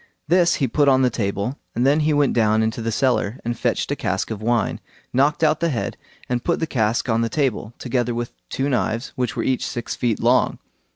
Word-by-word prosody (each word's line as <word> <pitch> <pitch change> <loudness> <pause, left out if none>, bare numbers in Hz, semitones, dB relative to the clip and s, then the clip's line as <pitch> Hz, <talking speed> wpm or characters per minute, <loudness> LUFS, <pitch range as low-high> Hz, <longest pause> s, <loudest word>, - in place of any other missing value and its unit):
This 175 +1 +4
he 135 - 0
put 145 +4 +2
on 130 -1 +4
the 125 - +3
table, 100 +4 -2 0.2
and 120 +3 +1
then 145 +3 +4
he 155 0 +2
went 145 -2 +3
down 110 -1 +3
into 110 +1 -2
the 115 0 -1
cellar, 125 -2 +1
and 120 0 -1
fetched - - -1
a - - +1
cask - - -2
of 110 -1 -4
wine, 115 0 0 0.3
knocked 145 +5 +2
out 155 -1 +3
the 170 - +1
head, 125 -7 -2 0.3
and 125 -1 -1
put 170 - 0
the 160 - 0
cask 115 -5 0
on 115 -1 +2
the 115 - 0
table, 120 -6 -1
together 120 -1 -1
with 120 0 -4 0.2
two 135 - -1
knives, 120 -2 -1
which 125 -1 -2
were - - -1
each 130 -2 0
six 120 - -4
feet 115 -4 0
long. 125 +2 +3
125 Hz, 225 wpm, -22 LUFS, 115-140 Hz, 0.3 s, This